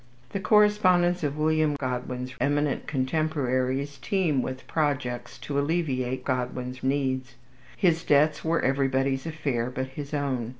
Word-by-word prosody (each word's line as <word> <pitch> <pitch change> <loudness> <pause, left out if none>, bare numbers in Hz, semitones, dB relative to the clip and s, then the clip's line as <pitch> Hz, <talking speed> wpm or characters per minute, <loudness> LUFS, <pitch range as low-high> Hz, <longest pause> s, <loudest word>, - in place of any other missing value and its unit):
The 200 - -2
correspondence 185 -3 +4
of 145 0 -1
William 155 -1 +2
Godwin's 125 -1 -4
eminent 145 0 0
contemporaries 135 -1 -1
teem 170 -9 +1
with 130 +1 -5
projects 130 -6 -2
to 140 -1 -2
alleviate 140 -5 -1
Godwin's 125 0 -2
needs. 130 -2 -1 0.4
His 165 -3 +2
debts 150 +1 +3
were 165 +1 +1
everybody's 135 +1 +1
affair 140 -7 -2
but 130 +1 -4
his 140 +1 -7
own. 135 -6 -1
140 Hz, 125 wpm, -27 LUFS, 130-155 Hz, 0.4 s, correspondence